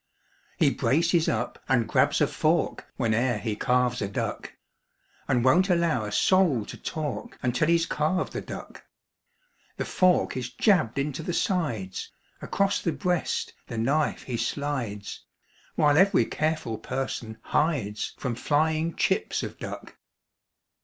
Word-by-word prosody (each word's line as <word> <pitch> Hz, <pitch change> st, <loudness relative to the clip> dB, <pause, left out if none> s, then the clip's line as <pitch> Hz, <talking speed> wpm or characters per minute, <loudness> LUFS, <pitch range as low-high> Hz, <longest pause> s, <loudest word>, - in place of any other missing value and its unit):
He -, -, +4 dB
braces 165 Hz, +3 st, +2 dB
up 115 Hz, +2 st, -2 dB
and 120 Hz, -5 st, +3 dB
grabs -, -, +2 dB
a -, -, +6 dB
fork -, -, 0 dB
Whene'er 115 Hz, +1 st, +1 dB
he 105 Hz, 0 st, -3 dB
carves 125 Hz, +1 st, +1 dB
a 100 Hz, -, 0 dB
duck 100 Hz, -, -4 dB, 0.8 s
And 125 Hz, -1 st, +2 dB
won't 180 Hz, +9 st, +4 dB
allow 170 Hz, -10 st, +2 dB
a 105 Hz, -, -5 dB
soul 165 Hz, -, +3 dB
to -, -, -8 dB
talk 150 Hz, -3 st, -5 dB
Until 125 Hz, +4 st, +1 dB
he's 170 Hz, 0 st, +3 dB
carved 165 Hz, +4 st, -1 dB
the -, -, -3 dB
duck. -, -, -9 dB, 0.9 s
The -, -, -2 dB
fork 185 Hz, -1 st, +2 dB
is 125 Hz, -2 st, -3 dB
jabbed 155 Hz, -, +2 dB
into 140 Hz, +2 st, -2 dB
the 170 Hz, +2 st, -3 dB
sides 120 Hz, -, -1 dB, 0.3 s
Across 200 Hz, 0 st, 0 dB
the 165 Hz, -, 0 dB
breast 175 Hz, +5 st, -1 dB
the 115 Hz, -, -6 dB
knife 140 Hz, +7 st, +1 dB
he 125 Hz, -3 st, -3 dB
slides 115 Hz, -5 st, -3 dB, 0.5 s
While 150 Hz, -1 st, +4 dB
every 190 Hz, 0 st, +5 dB
careful 155 Hz, -8 st, -2 dB
person 115 Hz, -3 st, -4 dB
hides 135 Hz, -10 st, -1 dB
From 125 Hz, -3 st, -2 dB
flying 155 Hz, +5 st, +1 dB
chips -, -, 0 dB
of -, -, -7 dB
duck. -, -, -8 dB
140 Hz, 140 wpm, -26 LUFS, 120-165 Hz, 0.9 s, a